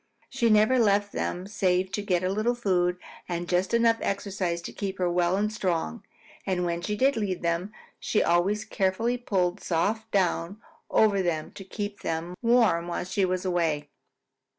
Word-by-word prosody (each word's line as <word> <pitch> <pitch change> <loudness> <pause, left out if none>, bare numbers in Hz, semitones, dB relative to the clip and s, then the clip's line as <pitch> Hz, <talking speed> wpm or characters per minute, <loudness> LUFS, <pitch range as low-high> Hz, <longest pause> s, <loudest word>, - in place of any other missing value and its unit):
She 245 -3 +1
never 215 +4 +4
left 205 -2 +3
them 180 +1 -3
save 190 -2 0
to 205 - -2
get 185 -3 0
a 185 - 0
little 215 +4 0
food 180 -6 +1 0.3
and 175 0 -3
just 180 +2 +1
enough 230 -1 +3
exercise 195 -3 -2
to - - -7
keep 195 -1 -4
her 180 -1 0
well 175 +1 +2
and 210 +1 0
strong, 170 - -2 0.4
and 180 -2 -1
when 170 0 -2
she 210 +4 -2
did 270 +5 +3
leave 195 -5 -2
them, 170 +4 -1 0.3
she 215 - +1
always 185 +5 +1
carefully 225 +5 0
pulled 185 -5 0
soft 215 +6 -1
down 190 -1 0 0.3
over 205 -3 +3
them 165 -4 -2
to 195 - -10
keep 205 +1 -5
them 165 +2 -3
warm 230 -8 +3
while 175 - -2
she 190 +2 0
was 185 +1 -2
away. 160 -5 0
190 Hz, 175 wpm, -27 LUFS, 175-210 Hz, 0.4 s, never